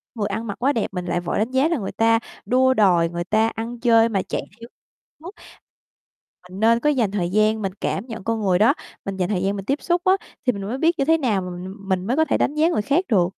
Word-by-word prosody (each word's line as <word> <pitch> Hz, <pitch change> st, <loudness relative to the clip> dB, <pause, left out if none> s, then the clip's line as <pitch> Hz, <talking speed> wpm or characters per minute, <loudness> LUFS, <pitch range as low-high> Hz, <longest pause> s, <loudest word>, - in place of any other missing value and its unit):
người 210 Hz, -3 st, -1 dB
ăn 230 Hz, +1 st, -4 dB
mặc 205 Hz, -, -4 dB
quá 275 Hz, +4 st, +2 dB
đẹp 225 Hz, -, -1 dB
mình 180 Hz, -1 st, -4 dB
lại 175 Hz, -, -1 dB
vội 175 Hz, -, -3 dB
đánh 220 Hz, +4 st, -1 dB
giá 260 Hz, +3 st, +3 dB
là 335 Hz, -1 st, 0 dB
người 200 Hz, -6 st, -4 dB
ta 225 Hz, 0 st, +3 dB, 0.3 s
đua 260 Hz, +1 st, +3 dB
đòi 180 Hz, -7 st, +3 dB
người 175 Hz, 0 st, -4 dB
ta 215 Hz, +5 st, +2 dB
ăn 230 Hz, +2 st, -5 dB
chơi 230 Hz, -1 st, +4 dB
mà 195 Hz, -4 st, 0 dB
chạy -, -, -1 dB, 0.2 s
theo 230 Hz, -, -10 dB, 0.5 s
mốt. 345 Hz, +5 st, -10 dB, 1.2 s
Mình 185 Hz, +2 st, -9 dB
nên 230 Hz, +2 st, +4 dB
có 295 Hz, -, +1 dB
dành 245 Hz, -9 st, +1 dB
thời 185 Hz, -4 st, -1 dB
gian 215 Hz, +3 st, +2 dB
mình 195 Hz, -2 st, -2 dB
cảm 195 Hz, -, -2 dB
nhận 225 Hz, -5 st, -7 dB
con 225 Hz, +1 st, -1 dB
người 185 Hz, -3 st, +2 dB
đó, 225 Hz, +6 st, +5 dB, 0.3 s
mình 195 Hz, -1 st, -4 dB
dành 180 Hz, -1 st, -1 dB
thời 190 Hz, -3 st, -1 dB
gian 195 Hz, +1 st, 0 dB
mình 195 Hz, -1 st, -6 dB
tiếp 275 Hz, +6 st, -1 dB
xúc 350 Hz, 0 st, 0 dB
á, 375 Hz, -, +5 dB, 0.3 s
thì 250 Hz, -, +3 dB
mình 200 Hz, -, -6 dB
mới 215 Hz, +6 st, -4 dB
biết 330 Hz, +3 st, +1 dB
như 275 Hz, -, +2 dB
thế 325 Hz, +2 st, +4 dB
nào 230 Hz, -10 st, 0 dB
mà 180 Hz, -, -6 dB
mình 180 Hz, +2 st, -7 dB
mình 190 Hz, -1 st, -1 dB
mới 245 Hz, -, +1 dB
có 315 Hz, -, +4 dB
thể -, -, +1 dB
đánh -, -, 0 dB
giá 315 Hz, +2 st, +3 dB
người 330 Hz, -, 0 dB
khác 285 Hz, -, +1 dB
được. 180 Hz, -6 st, +3 dB
225 Hz, 275 wpm, -22 LUFS, 195-260 Hz, 1.2 s, đó